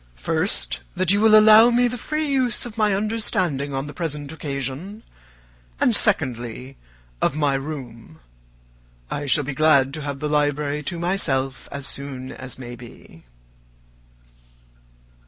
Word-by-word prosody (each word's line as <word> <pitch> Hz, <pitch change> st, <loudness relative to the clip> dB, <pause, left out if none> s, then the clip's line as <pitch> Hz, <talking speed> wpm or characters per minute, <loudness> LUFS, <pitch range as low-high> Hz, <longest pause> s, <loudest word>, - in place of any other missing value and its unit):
First, 60 Hz, 0 st, -1 dB, 0.2 s
that 185 Hz, -1 st, +1 dB
you 205 Hz, +1 st, +2 dB
will 215 Hz, -1 st, +7 dB
allow 215 Hz, +2 st, +8 dB
me 245 Hz, +1 st, +3 dB
the 245 Hz, -, -4 dB
free 305 Hz, +6 st, -3 dB
use 260 Hz, -6 st, 0 dB
of 235 Hz, -3 st, -8 dB
my 210 Hz, -3 st, +2 dB
understanding 185 Hz, -9 st, -1 dB
on 135 Hz, +1 st, -2 dB
the 145 Hz, -, -8 dB
present 150 Hz, -4 st, -4 dB
occasion; 150 Hz, -, -5 dB, 0.8 s
and, -, -, +3 dB
secondly, 125 Hz, +2 st, +1 dB, 0.5 s
of -, -, +1 dB
my 145 Hz, -2 st, +1 dB
room. 130 Hz, -, -7 dB, 0.9 s
I 145 Hz, -, -3 dB
shall 145 Hz, +2 st, +3 dB
be 140 Hz, +1 st, -4 dB
glad 140 Hz, -2 st, +3 dB
to 155 Hz, -, -5 dB
have 140 Hz, -1 st, -5 dB
the 150 Hz, -, -2 dB
library 150 Hz, 0 st, 0 dB
to 175 Hz, -, -6 dB
myself 140 Hz, -7 st, -1 dB
as 140 Hz, -1 st, -5 dB
soon 135 Hz, -2 st, -5 dB
as 130 Hz, -1 st, -8 dB
may 120 Hz, -2 st, -8 dB
be." 115 Hz, -, -15 dB
145 Hz, 140 wpm, -22 LUFS, 135-195 Hz, 0.9 s, allow